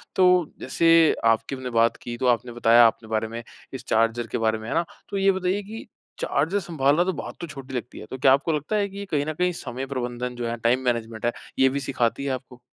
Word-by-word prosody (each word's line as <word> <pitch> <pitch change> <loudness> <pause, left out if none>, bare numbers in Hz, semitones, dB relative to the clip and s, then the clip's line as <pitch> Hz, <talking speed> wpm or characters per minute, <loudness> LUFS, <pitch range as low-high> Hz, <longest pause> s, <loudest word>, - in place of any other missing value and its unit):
तो 180 -3 +4
जैसे 165 +4 +4
आपकी 115 +3 +2
हमने 130 -1 -6
बात 115 -1 +2
की 120 0 -6
तो 130 +1 0
आपने 120 0 +1
बताया 120 0 +6
आपने 110 0 -4
बारे 110 0 0
में, 115 +1 -7 0.3
इस 130 - -7
चार्जर 115 +1 +1
के - - -3
बारे 110 -1 +1
में 110 - -8
है - - -2
ना? 170 +1 +2 0.2
तो 200 - -3
ये 195 0 +4
बताइए 190 +1 -1
कि 220 +4 -9 0.3
चार्जर 160 +9 0
सँभालना 160 -3 +2
तो 190 +1 -1
बात - - -7
तो 170 - -4
छोटी 135 -4 -9
लगती 125 0 -5
है। - - -9
तो 130 - -4
क्या 130 0 +5
आपको 145 +4 +1
लगता 150 +7 -2
है 205 -1 +1
कि 200 +1 -7
कहीं 145 -2 +1
न 155 - -3
कहीं 180 +3 +1
समय 130 -4 -5
प्रबंधन 125 -2 -4
जो 120 -1 -3
है 115 - -2
टाइम 120 +2 +2
मैनेजमेंट 115 -2 -2
है 120 - +2 0.3
ये 130 0 +6
भी 140 +2 -2
सिखाती 135 -1 -1
है - - -1
आपको? 125 -1 -7
130 Hz, 245 wpm, -24 LUFS, 120-165 Hz, 0.3 s, बताया